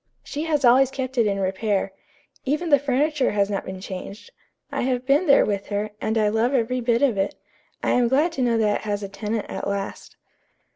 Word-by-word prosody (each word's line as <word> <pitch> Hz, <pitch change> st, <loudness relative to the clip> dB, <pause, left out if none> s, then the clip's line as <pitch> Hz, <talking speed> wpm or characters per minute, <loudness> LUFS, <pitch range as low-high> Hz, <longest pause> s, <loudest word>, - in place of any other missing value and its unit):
She 300 Hz, +2 st, -4 dB
has 300 Hz, -4 st, +1 dB
always 255 Hz, +2 st, +6 dB
kept 265 Hz, -1 st, -4 dB
it 225 Hz, -, +4 dB
in 200 Hz, -1 st, -1 dB
repair. 195 Hz, +1 st, -1 dB, 0.5 s
Even 305 Hz, +5 st, -1 dB
the 285 Hz, -, +6 dB
furniture 285 Hz, +1 st, +1 dB
has 200 Hz, 0 st, +1 dB
not 195 Hz, -, -2 dB
been 190 Hz, 0 st, -6 dB
changed. 190 Hz, +2 st, -8 dB, 0.4 s
I -, -, -2 dB
have 250 Hz, 0 st, -1 dB
been 285 Hz, +6 st, +3 dB
there 280 Hz, -, +6 dB
with 200 Hz, -1 st, -2 dB
her, 210 Hz, +1 st, -2 dB
and 220 Hz, +1 st, 0 dB
I 215 Hz, -1 st, +3 dB
love 225 Hz, +5 st, +1 dB
every 250 Hz, +1 st, 0 dB
bit 235 Hz, +1 st, +1 dB
of 240 Hz, -8 st, +2 dB
it. 195 Hz, -, -1 dB, 0.5 s
I -, -, +1 dB
am 245 Hz, -1 st, +3 dB
glad 290 Hz, +8 st, +2 dB
to 275 Hz, -, -4 dB
know 235 Hz, -2 st, +2 dB
that 210 Hz, -2 st, +2 dB
it -, -, -10 dB
has 205 Hz, -1 st, -3 dB
a 200 Hz, -, -5 dB
tenant 215 Hz, +2 st, -3 dB
at -, -, -5 dB
last." 200 Hz, 0 st, -5 dB
230 Hz, 220 wpm, -23 LUFS, 205-270 Hz, 0.5 s, always